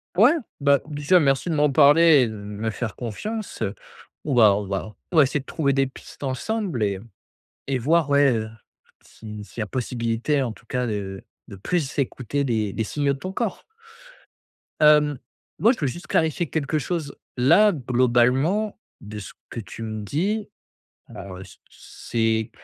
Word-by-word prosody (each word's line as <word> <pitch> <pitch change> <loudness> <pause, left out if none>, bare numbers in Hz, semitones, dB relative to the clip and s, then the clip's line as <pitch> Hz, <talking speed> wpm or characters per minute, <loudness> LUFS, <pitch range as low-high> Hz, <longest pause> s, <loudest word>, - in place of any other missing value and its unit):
Ouais, 225 +9 +7 0.3
bah, 140 -1 +4
déjà, 150 +4 +3
merci 140 +2 +1
de 160 - 0
m'en 150 0 +3
parler 150 +1 +6
et 120 - +2
de - - -7
me 105 +2 -5
faire 110 0 -4
confiance, 205 - -5
heu, 105 -1 -2 0.5
on 145 - -2
va 110 -5 +6
on 105 0 -3
va 100 +2 -4 0.2
on 165 - -1
va 150 - +9
essayer 140 +2 -1
de 135 - -20
trouver 140 -4 0
des 135 -1 +2
pistes 135 - -13
ensemble 150 - -2
et 100 -2 -2 0.7
et 135 -2 0
voir, 155 +3 +2
ouais, 140 -2 +5
heu, 110 -1 -3 0.5
si 105 -1 -10
s'il 110 - -9
y - - +1
a - - -3
possibilité, 120 +3 -1
en 120 -3 -2
tout 115 - -19
cas, 125 +1 -1
de 100 -3 -4 0.2
de 100 - -9
plus 145 - -2
écouter 140 +1 -1
les 110 -6 -1
les 110 - -2
signaux 140 +3 0
de - - -10
ton 185 +4 -6
corps 225 -1 -3 1.2
hem, 150 -2 +5 0.4
moi, 225 +4 +5
je 260 - -3
veux 145 - 0
juste 175 +7 -6
clarifier 160 0 0
quelque 155 0 -1
chose, 155 -2 -3 0.2
là, 200 +12 +5
globalement 130 - +1 0.2
de 105 0 -8
ce 100 - -9 0.2
que - - -6
tu 110 +2 -8
me 110 -1 -5
dis, 200 - -1 0.6
alors, 95 -2 -9
heu, 95 - -9
c - - -15
c'est 110 -1 -2
135 Hz, 180 wpm, -23 LUFS, 110-155 Hz, 1.2 s, va